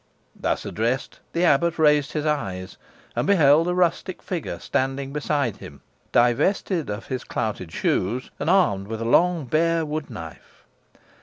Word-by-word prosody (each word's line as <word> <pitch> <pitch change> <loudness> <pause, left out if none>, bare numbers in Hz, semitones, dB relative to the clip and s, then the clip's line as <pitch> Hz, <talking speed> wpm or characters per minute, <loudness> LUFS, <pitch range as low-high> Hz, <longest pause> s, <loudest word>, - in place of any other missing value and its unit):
Thus - - -2
addressed, 120 +5 -2
the 170 - 0
abbot 170 +2 +3
raised 150 -3 +3
his 150 -1 -2
eyes, 95 -12 -2 0.4
and - - 0
beheld 160 -4 +5
a 180 - 0
rustic 180 +1 0
figure 165 - -4
standing 135 +7 -2
beside 145 -5 -1
him, - - -12 0.3
divested 150 - +2
of 105 +2 -5
his 130 -2 -4
clouted 100 -6 -3
shoes, 115 +9 -1
and 150 - -1
armed 105 - +3
with 110 0 -4
a 115 - -3
long 170 +5 +3
bare 165 +4 +1
wood 150 0 -4
knife. 80 - -11
145 Hz, 150 wpm, -24 LUFS, 115-165 Hz, 0.4 s, beheld